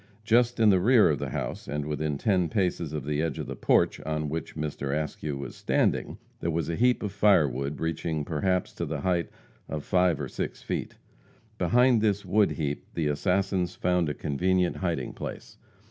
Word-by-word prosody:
Just 120 +2 +3
in 110 -2 +6
the 95 - +4
rear 110 -2 +5
of 70 - -1
the - - -3
house, - - -4
and 75 0 -3
within 75 -1 -2
ten 90 -1 +1
paces 90 -4 -1
of 75 -4 -4
the 75 0 0
edge 80 -4 -2
of - - -4
the - - -6
porch - - +2
on 75 -1 -2
which 80 +2 -5
Mr. 75 -1 -2
Askew 75 -1 -4
was 70 - -7
standing, - - 0 0.2
there 85 - -2
was 85 -2 -1
a - - -2
heap 125 +3 +2
of 105 - -2
firewood 75 - +2
reaching 80 -2 -2
perhaps 90 +4 0
to 85 - -3
the 75 -1 -3
height 90 -1 0 0.4
of 75 -2 -4
five 90 -4 +2
or - - -3
six - - -5
feet. - - -3 0.6
Behind 125 -1 +4
this 105 -2 +1
wood 105 -1 +3
heap 75 -2 -3
the 80 - 0
assassins 90 +4 0
found 90 -3 +1
a 75 - -3
convenient 90 +5 0
hiding 85 -9 -2
place. - - -8
85 Hz, 190 wpm, -27 LUFS, 75-95 Hz, 0.6 s, in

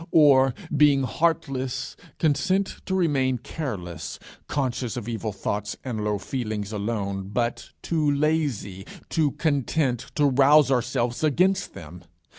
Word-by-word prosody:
or, 135 -5 +5 0.2
being 145 -2 +5
heartless, 135 -4 -1 0.2
consent 185 +6 +1
to 190 - 0
remain 135 -8 +2
careless, 105 - -5 0.3
conscious 130 -4 -2
of 120 -3 -5
evil 115 -2 -3
thoughts 105 +1 -3
and 115 -5 -3
low 105 -1 0
feelings 110 -2 -4
alone, 100 -2 -3
but 120 +1 -2
too 155 -3 +1
lazy, 145 -10 0 0.3
too 155 -3 +2
content 140 -4 0
to 150 - +3
rouse 140 +1 +5
ourselves 125 0 0
against 180 +5 +2
them? 85 +2 -10
130 Hz, 120 wpm, -25 LUFS, 110-150 Hz, 0.3 s, or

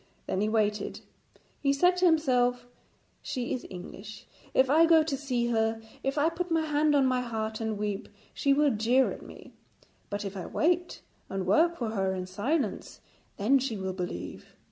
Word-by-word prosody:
Then 190 - -1
he 210 - +1
waited. 215 -1 0 0.6
He 275 - +2
said 355 +6 +4
to 365 - +3
himself, 250 -6 +2 0.6
'She 245 -2 -3
is 250 - -5
English. 195 +3 -9 0.3
If 260 - +4
I 320 +5 +5
go 325 -1 +6
to 305 -3 -2
see 250 -4 -1
her, 225 -1 +1 0.2
if 270 +2 -2
I 295 +2 +3
put 360 +2 -4
my 325 -1 +1
hand 300 0 +2
on 275 -2 +4
my 255 -1 +2
heart 220 -2 -3
and 220 -1 -2
weep, 205 0 -3 0.2
she 280 - +1
will 290 +1 +4
jeer 240 +4 +2
at - - -8
me; - - -13 0.6
but 205 0 -3
if 195 0 -5
I 185 - -5
wait 350 +2 0 0.3
and 190 -1 -3
work 340 +2 +3
for 230 -3 -2
her 190 -3 0
in 185 -1 -4
silence, 210 - -2 0.4
then 250 +7 +3
she 250 -4 -2
will 190 -1 -3
believe.' 175 - -6
245 Hz, 185 wpm, -28 LUFS, 210-295 Hz, 0.6 s, go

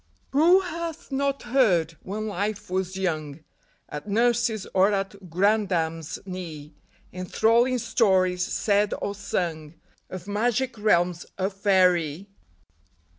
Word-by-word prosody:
Who 335 +7 +5
hath 335 -4 -6
not 275 0 -1
heard, 200 - +2
when 215 +3 -5
life 205 -1 -3
was 185 0 -2
young, 155 -5 -3 0.5
At 150 +7 -7
nurse's 230 -1 +1
or 190 +2 +4
at 195 -1 -4
grandam's 175 -4 0
knee, 165 -5 -7 0.4
Enthralling 230 +7 +2
stories, 190 -6 +2
said 205 +2 +1
or 200 - -3
sung, 165 -6 -3 0.3
Of 185 0 -8
magic 240 +5 0
realms 175 -4 +2
of 190 +1 -1
faerie 185 -3 +2
195 Hz, 110 wpm, -25 LUFS, 175-225 Hz, 0.5 s, Who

